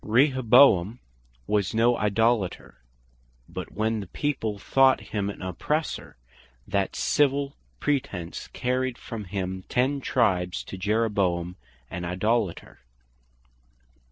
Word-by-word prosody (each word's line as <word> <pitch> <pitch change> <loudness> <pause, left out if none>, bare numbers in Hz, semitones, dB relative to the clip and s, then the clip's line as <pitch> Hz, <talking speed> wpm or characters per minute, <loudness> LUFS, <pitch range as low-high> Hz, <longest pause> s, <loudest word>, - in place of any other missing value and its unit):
Rehoboam 125 - +5 0.5
was 105 - 0
no 120 +2 +4
Idolater; 105 -2 0 0.7
but - - -7
when 110 +1 -1
the 100 - -6
people 110 -3 -2
thought 135 +6 +4
him 100 -2 0
an 100 - -7
Oppressor; 150 - -3 0.5
that 100 -1 -1
Civil 140 -1 +1 0.2
pretence 100 -12 -2
carried 125 0 -2
from 110 -3 -7
him 95 0 -4
ten 135 +3 +1
Tribes 90 -9 +1
to - - -8
Jeroboam 95 -4 0 0.4
an 90 0 -4
Idolater. 95 +2 -1
110 Hz, 100 wpm, -26 LUFS, 95-125 Hz, 0.7 s, Rehoboam